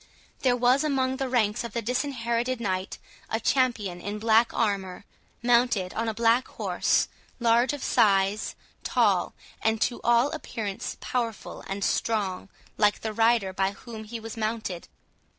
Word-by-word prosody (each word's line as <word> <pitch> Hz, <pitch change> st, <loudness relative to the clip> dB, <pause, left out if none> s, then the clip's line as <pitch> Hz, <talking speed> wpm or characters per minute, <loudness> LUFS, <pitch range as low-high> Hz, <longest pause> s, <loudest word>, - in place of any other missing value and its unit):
There 250 Hz, -2 st, +3 dB
was 250 Hz, +4 st, +3 dB
among 265 Hz, -3 st, 0 dB
the 265 Hz, -1 st, -2 dB
ranks 235 Hz, -3 st, +1 dB
of 235 Hz, -, -6 dB
the 235 Hz, -, -1 dB
Disinherited 245 Hz, 0 st, -1 dB
Knight 190 Hz, -4 st, -2 dB, 0.3 s
a 225 Hz, -, 0 dB
champion 225 Hz, -8 st, 0 dB
in 205 Hz, +3 st, -4 dB
black 225 Hz, +2 st, +4 dB
armour, 200 Hz, -3 st, -1 dB, 0.4 s
mounted 235 Hz, -6 st, +2 dB
on 230 Hz, +1 st, -2 dB
a -, -, -2 dB
black 230 Hz, +2 st, +3 dB
horse, -, -, +1 dB, 0.3 s
large 235 Hz, +2 st, +3 dB
of 290 Hz, -2 st, -5 dB
size, 200 Hz, -2 st, +2 dB, 0.3 s
tall, -, -, +2 dB, 0.3 s
and 220 Hz, 0 st, +1 dB
to 240 Hz, -, 0 dB
all 240 Hz, +4 st, +4 dB
appearance 215 Hz, -10 st, -5 dB
powerful 235 Hz, -4 st, -3 dB
and 195 Hz, +1 st, -3 dB
strong, 200 Hz, -4 st, -1 dB, 0.3 s
like 210 Hz, -1 st, +3 dB
the 220 Hz, -1 st, -3 dB
rider 225 Hz, -3 st, +2 dB
by 190 Hz, +1 st, 0 dB
whom 220 Hz, 0 st, -9 dB
he 230 Hz, +2 st, -6 dB
was 225 Hz, 0 st, -7 dB
mounted. 215 Hz, -5 st, -3 dB
230 Hz, 150 wpm, -27 LUFS, 205-245 Hz, 0.4 s, black